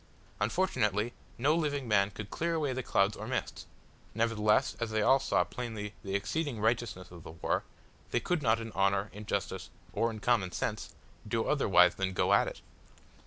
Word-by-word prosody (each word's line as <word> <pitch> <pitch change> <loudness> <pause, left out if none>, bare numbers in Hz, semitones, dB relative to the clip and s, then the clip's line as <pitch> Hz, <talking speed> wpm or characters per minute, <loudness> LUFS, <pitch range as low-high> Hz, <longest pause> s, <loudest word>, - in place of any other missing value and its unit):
Unfortunately 110 - +1 0.2
no 145 +6 +3
living 145 -5 -1
man 100 -2 +3
could 105 0 -8
clear 170 0 -1
away 145 -5 0
the 130 - -2
clouds 100 -3 +2
or - - -7
mists; - - -3 0.5
nevertheless, 110 -2 +2
as 115 -1 -1
they 110 -1 +1
all 135 +4 +5
saw 135 - +2
plainly 110 -4 -5
the 95 -2 -3
exceeding 115 +6 -1
righteousness 110 -4 -1
of 85 -1 -10
the - - -10
war, 85 - -1 0.5
they - - +1
could 180 -3 -1
not 115 -3 +3
in 115 0 -6
honour, 100 +1 +1
in 105 +1 -9
justice, 95 -6 -2 0.2
or 115 - +1
in 110 -1 -6
common 105 -5 +2
sense, - - -3 0.3
do - - 0
otherwise - - +5
than 95 0 -2
go - - +2
at - - +4
it. - - -7
110 Hz, 180 wpm, -31 LUFS, 100-125 Hz, 0.5 s, all